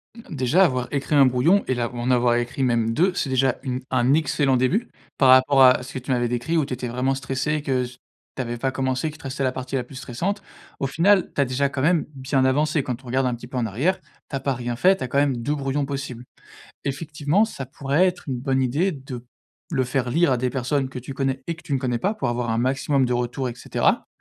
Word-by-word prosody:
Hem, 225 -9 -10
déjà, 135 +8 +3
avoir 130 -5 -1
écrit 140 +1 -1
1 140 -1 +7
brouillon 130 +11 +3
et 130 - +1
là, 120 -1 -2
en 120 +1 -1
avoir 120 -1 +3
écrit 120 +3 -2
même 115 -2 +1
2, 180 +7 +2
c'est 145 - -2
déjà 130 0 +2
une 130 -2 -3
un 130 +1 +3
excellent 145 -3 +2
début, 165 - +1 0.3
par 135 -2 +5
rapport 130 +1 +6
à 125 0 +6
ce 130 - -10
que 130 - -3
tu 130 +2 -5
m'avais 120 -1 +1
décrit, 125 +8 -1
où 155 - +2
tu 135 - -5
étais 125 0 -4
vraiment 125 +3 0
stressée, 135 +2 -2
et 150 - -2
que 130 -3 0
s 125 0 -8 0.4
tu - - -2
avais 120 -1 -4
pas 130 +3 -1
commencé, 130 +3 -1
qu'il 155 - -11
te - - -18
restait 135 +1 -3
la 130 - +2
partie 130 +1 -5
la 130 - 0
plus 130 +3 -14
stressante. 140 +10 -3 0.4
Au 135 - 0
final, 190 +7 +3
tu - - +2
as, - - +3
déjà, 130 +2 0
quand 140 -1 -4
même 165 +2 +2
bien 130 0 0
avancé. 150 +2 +2
Quand 125 +1 -5
on - - -13
regarde 130 +2 +1
un 125 -1 0
petit 120 - -11
peu 130 - -6
en 120 - 0
arrière, 135 - 0 0.3
tu - - -4
as - - -1
pas 135 +1 -1
rien 120 -1 -4
fait, 190 +8 +5
tu - - -5
as - - -2
quand 140 - -2
même 140 -2 +3
2 145 +6 -1
brouillons 140 0 -1
possibles. 135 -3 -5 0.6
Effectivement, 150 +6 0
ça 140 - -6
pourrait 140 +6 +1
être 180 0 -2
une 130 -2 -2
bonne 135 0 +1
idée 145 +10 +1
de 135 -3 -7
p 120 - -15 0.5
le 135 -5 +1
faire 125 0 -1
lire 165 +1 +3
à 125 - +1
des 125 +1 0
personnes 130 +2 -1
que 130 - -7
tu 130 +2 -7
connais 135 -1 -2
et 170 - -2
que 170 - -15
tu 140 - -3
ne - - +1
connais 125 -2 -1
pas 200 - 0
pour 165 - -2
avoir 120 0 -2
un 110 - 0
maximum 135 +2 +1
de 125 - 0
retours, 125 +1 -1
et 120 - -8
cetera. - - 0
130 Hz, 270 wpm, -23 LUFS, 125-145 Hz, 0.6 s, 1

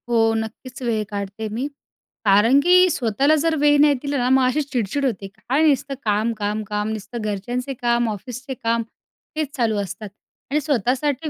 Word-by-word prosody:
हो. 225 -1 +3
नक्कीच 225 +4 -6
वेळ 225 -3 0
काढते 200 +1 -5
मी. 245 +6 -2 0.6
कारण 210 +7 +5
की 365 +2 +6
स्वतःला 275 +1 +2
जर 320 +1 +1
वेळ 290 0 +5
नाही 295 -1 +6
दिला 285 -1 -2
ना, 250 -1 +1
मग 265 0 +4
अशी 290 +4 +1
चिडचिड 275 -1 -2
होते. 200 -6 -2
काय 260 +9 -1
नुसतं 275 -1 +1
काम, 215 +2 +1
काम, 210 +1 -2
काम. 210 +1 -3
नुसतं 220 +2 -5
घरच्यांचे 240 +6 -3
काम 240 -1 +1
ऑफिसचे 250 +6 -6
काम 230 0 +1 0.6
हेच 310 -1 0
चालू 225 -4 +1
असतात. 200 +2 -6 0.4
आणि 300 +2 +2
स्वतःसाठी 280 +3 0
240 Hz, 170 wpm, -22 LUFS, 215-280 Hz, 0.6 s, की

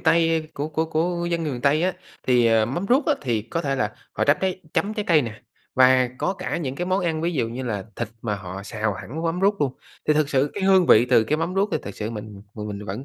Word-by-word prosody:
Tây 165 -1 +2
của 145 +2 -3
của 160 +1 0
của 170 +2 -1
dân 170 -1 0
người 150 - -2
miền 120 - -5
Tây 145 +5 +3
á, 185 0 +2 0.3
thì 120 -2 +4
mắm 115 - +1
ruốc 265 +4 +3
á, 300 - +4
thì 115 -5 -1
có 165 +8 -3
thể 135 -1 0
là 105 -3 -1 0.2
họ - - 0
chấm 145 - +4
trái 185 -1 -1
chấm 210 +2 0
trái 210 - -2
cây 155 -4 +4
nè, 110 -2 -7 0.3
và 130 -1 +5
có - - 0
cả 185 -1 -4
những 135 -6 -3
cái 175 - -3
món 185 0 +1
ăn, 160 -2 0
ví 170 - 0
dụ 125 -8 0
như 125 +3 -5
là 105 -6 -3
thịt 120 -2 -3
mà 105 -3 -1
họ 95 -1 -7
xào 105 -1 -2
hẳn 115 - -6
mắm 165 +2 0
ruốc 200 -2 +2
luôn, 135 -3 +1 0.4
thì 150 - +5
thực 150 -1 +2
sự 140 +1 +1
cái 200 - -4
hương 190 -2 +5
vị 110 +3 +7
từ 120 -3 +4
cái 150 +8 0
mắm 165 +3 -2
ruốc 200 +2 +2
thì - - +2
thực 100 - -7
sự 110 +1 -3
mình 105 -3 -8
mình 105 -1 -5
mình 105 0 -6
vẫn 105 +8 -5
140 Hz, 275 wpm, -24 LUFS, 115-170 Hz, 0.4 s, vị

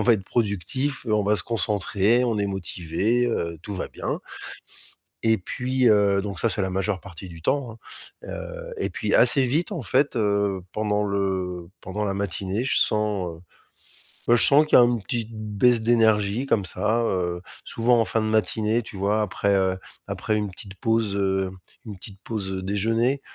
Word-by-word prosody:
on - - +2
va 115 - +5
être 95 -4 0
productif, 120 - -2
heu, 110 - +1
on 105 - +2
va 105 +1 +3
se - - +1
concentrer, 110 +1 +1
on 115 -3 0
est 100 - 0
motivé, 95 +5 -1
heu, 85 -8 -2
tout 105 - -6
va - - -4
bien». - - -4 1.0
Et 110 0 +4
puis, 130 +6 -1
heu, 100 -2 +4
donc 100 -4 -5
ça, 115 - +2
c'est 105 - -1
la 95 - -1
majeure 95 +1 -1
partie 95 0 -10
du 85 -1 -11
temps, 130 -1 0
hein. 115 - -14 0.5
Heu, - - -7
et - - -1
puis - - -2
assez 145 - +6
vite, 155 - 0
en 165 -8 -4
fait, 140 +6 +1
heu, 100 -3 +1
pendant 105 -1 0
le 95 -3 -2
pendant 105 +3 -3
la 95 - -1
matinée 100 +2 -2
je 135 - +2
sens, 105 -4 +1
heu, 80 - -16 0.9
ben 120 - +6
je - - +3
sens 150 +2 +6
qu'il - - +5
y - - +9
a - - +7
un 120 0 +2
petit 115 +2 -3
baisse 110 +2 +2
d'énergie 110 0 +2
comme 100 -8 +1
ça, 115 +5 0
heu, 90 -5 -1 0.2
souvent 120 +1 +2
en 115 - +3
fin 115 - 0
de 110 - -1
matinée, 110 +1 +1
tu 105 - -10
vois. 100 +3 +1
Après, 100 0 0
heu, 95 -1 +1 0.3
après 110 0 -1
une 105 -1 -2
petite 95 +2 -10
pause, 110 -1 0
heu, 95 -1 0 0.4
une 105 -2 -7
petite 95 +1 -10
pause, 100 -4 -4
heu, 95 - -3
déjeuner. 115 +7 0
105 Hz, 195 wpm, -24 LUFS, 95-115 Hz, 1.0 s, y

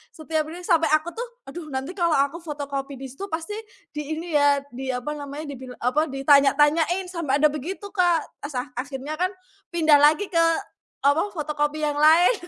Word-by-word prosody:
setiap 315 -1 -2
ini 345 +3 -8
sampai 330 -2 +3
aku 310 +3 -2
tuh, 475 +7 -5 0.2
"Aduh 310 +3 -8
nanti 265 +3 -4
kalo 345 -4 +1
aku 280 +5 +1
fotokopi 285 -3 -5
di 270 - -8
situ 385 +10 -7
pasti 330 +3 -4 0.4
di 300 +1 -4
ini 335 +1 -6
ya, 285 -1 +4
diapa 260 +2 -3
namanya, 290 +1 -7
dibil 255 -2 -9
apa, 290 +6 +1
ditanya-tanyain." 295 +5 +3
Sampe 335 -7 -1
ada 295 +1 +4
begitu 370 +7 -6
Kak. 350 -5 +2 0.2
Asa 260 -2 -4
akhirnya 285 +3 -5
kan 365 +1 +2 0.5
pindah 310 -3 +5
lagi 305 +7 +4
ke 335 -1 +4 0.6
apa, 300 +8 +3
fotokopi 300 0 -2
yang 295 -1 0
lain. 320 +7 +6
300 Hz, 170 wpm, -24 LUFS, 280-335 Hz, 0.6 s, lain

